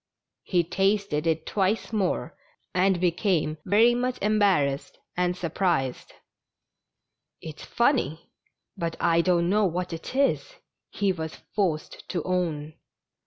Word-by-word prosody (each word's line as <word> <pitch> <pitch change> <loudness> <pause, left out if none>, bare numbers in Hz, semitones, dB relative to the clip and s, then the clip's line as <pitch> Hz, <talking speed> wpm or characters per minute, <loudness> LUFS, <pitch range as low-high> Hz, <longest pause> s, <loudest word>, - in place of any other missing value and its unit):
He 175 -2 +1
tasted 195 -3 0
it 160 -1 0
twice 205 +3 0
more, 185 -5 -1 0.4
and 185 0 +3
became 175 -3 +1
very 225 +4 +5
much 250 +1 -1
embarrassed 195 -10 +1 0.2
and 180 0 0
surprised. 170 -6 -1 0.7
" - - -59 0.5
It's 155 -2 -8
funny, 235 - 0 0.4
but 165 -1 -3
I 170 -1 +3
don't 175 -1 +2
know 210 +3 +3
what 180 0 -3
it 165 +9 -7
is," 280 - +1 0.3
he 200 -2 0
was 160 -3 -5 0.2
forced 175 -7 -2
to 175 -4 -2
own. 165 -5 -2
180 Hz, 120 wpm, -26 LUFS, 165-200 Hz, 0.7 s, very